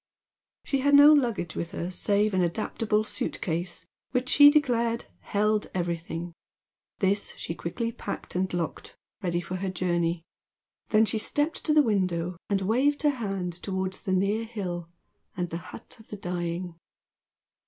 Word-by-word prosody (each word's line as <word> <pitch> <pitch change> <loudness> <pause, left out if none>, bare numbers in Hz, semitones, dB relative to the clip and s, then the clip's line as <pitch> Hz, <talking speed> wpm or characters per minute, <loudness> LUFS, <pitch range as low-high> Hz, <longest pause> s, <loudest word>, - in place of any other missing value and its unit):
She 275 - 0
had 285 +2 +4
no 290 +2 +9
luggage 235 - +1
with 170 +2 -4
her, 175 -1 -3
save 205 +3 +1
an 185 - +2
adaptable 215 +4 0
suitcase 175 -4 -3 0.2
which, 255 0 -1
she 290 0 +9
declared 240 -6 +1
"held 210 +1 0
everything." 170 -1 -3 0.6
This 200 0 +1
she - - -4
quickly 230 +8 -3
packed - - -6
and 185 +1 0
locked, 175 -2 -4 0.3
ready 175 -3 0
for 185 +1 -5
her 190 +1 -2
journey. 175 -2 0 0.7
Then 220 0 +5
she 220 - -1
stepped 295 +8 -1
to 305 - +3
the 300 - +7
window 180 -6 0
and 200 -2 +1
waved 270 +9 +2
her 295 - +5
hand 195 -8 -4
towards 190 -1 -2
the 190 - -2
near 200 +4 +1
hill 180 -7 -5 0.5
and 175 -1 -2
the 165 - -2
"hut - - -11
of 220 - -16
the 210 - -7
dying." 175 -1 -3
195 Hz, 155 wpm, -27 LUFS, 175-230 Hz, 0.7 s, no